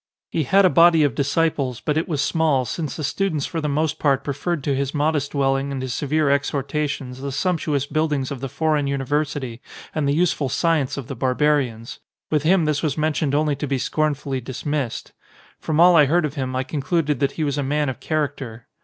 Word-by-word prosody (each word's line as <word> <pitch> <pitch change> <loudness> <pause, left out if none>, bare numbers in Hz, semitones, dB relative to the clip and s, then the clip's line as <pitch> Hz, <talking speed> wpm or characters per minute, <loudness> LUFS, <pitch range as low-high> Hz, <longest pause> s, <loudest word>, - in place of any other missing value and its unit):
He 160 - 0
had 195 +8 +5
a - - +6
body 165 -2 +6
of 145 -4 +2
dis 140 +3 -1
ciples, 140 -7 0
but 150 - +1
it 160 - 0
was 145 -4 0
small, 150 -4 +1
since 155 +5 -4
the 155 - -5
students 160 -1 -1
for 165 - -3
the 150 - -1
most 155 +2 0
part 140 -3 +2
preferred 145 +2 -2
to 140 -1 0
his 140 +2 -2
modest 145 -1 0
dwelling 135 0 +1
and 135 - -3
his 130 -1 -3
severe 150 +1 0
exhortations 140 -1 -1
the 140 0 -4
sumptuous 150 -2 0
buildings 150 -3 -1
of 140 - -4
the 135 - -4
foreign 155 0 0
university 140 -2 -2 0.3
and 155 -3 0
the 140 - +2
useful 155 -5 +1
science 160 -3 +1
of 140 - -5
the 135 - -6
barbarians: 130 -2 0 0.3
with 150 -2 +2
him 170 +2 +3
this 150 -2 0
was 155 -2 -1
mentioned 155 -2 0
only 150 -1 +1
to 145 +1 -4
be 135 0 0
scornfully 140 -1 -1
dismissed.. 135 +1 -4 0.5
From 155 0 -1
all 175 +1 +7
I 150 -3 +7
heard 165 +3 +2
of 145 - -3
him 130 -3 -3
I 130 - 0
concluded 145 0 -1
that 140 0 0
he 160 - -2
was 145 -1 -1
a - - 0
man 145 +2 0
of 130 - -4
character. 135 -7 -3
145 Hz, 210 wpm, -22 LUFS, 135-155 Hz, 0.5 s, all